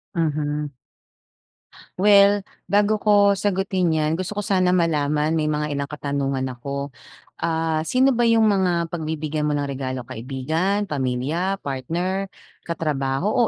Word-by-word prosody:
Mhm. 150 -2 -1 1.3
Well, 200 0 +5 0.2
bago 205 +1 +3
ko 205 -1 +5
sagutin 190 -2 0
'yan, 155 0 +1
gusto 185 +4 -4
ko 205 - -1
sana 185 -2 +2
malaman, 150 -2 +1
may 155 -2 0
mga 150 0 -1
ilang 140 0 -3
katanungan 140 -2 -2
ako. 140 +3 -5 0.5
Ah, 160 -1 0
sino 260 +2 +4
ba 240 0 +2
'yung 225 -1 +4
mga 180 -5 +1
pagbibigyan 155 -2 -2
mo 150 - 0
ng 145 - -1
regalo, 130 -2 -4
kaibigan, 145 - -2
pamilya, 145 +7 -1
partner, 175 +9 -2 0.4
katrabaho 155 - 0
160 Hz, 125 wpm, -22 LUFS, 145-195 Hz, 1.3 s, Well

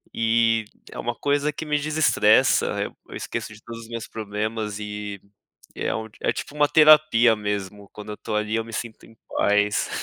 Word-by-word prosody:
E 115 0 +2 0.3
é - - -9
uma 120 - -2
coisa 145 +3 0
que 150 - -6
me 150 -1 +1
desestressa. 155 +2 +3 0.4
Eu - - -10
esqueço 110 - -5
de 110 - -15
todos 115 -1 -9
os 115 - -13
meus 115 -1 -6
problemas 105 0 -4
e, 105 -1 -6 0.5
é - - -2
um 110 0 -4
é - - +1
tipo - - -7
uma 150 -1 +3
terapia 150 -7 +6
mesmo. 105 -1 -4
Quando 105 0 -8
eu - - -7
tô 110 - -6
ali, 105 +1 0
eu 115 - -1
me 115 - -11
sinto 115 -2 -6
em 115 - -19 0.2
paz. 105 0 +2
110 Hz, 185 wpm, -24 LUFS, 105-120 Hz, 0.5 s, terapia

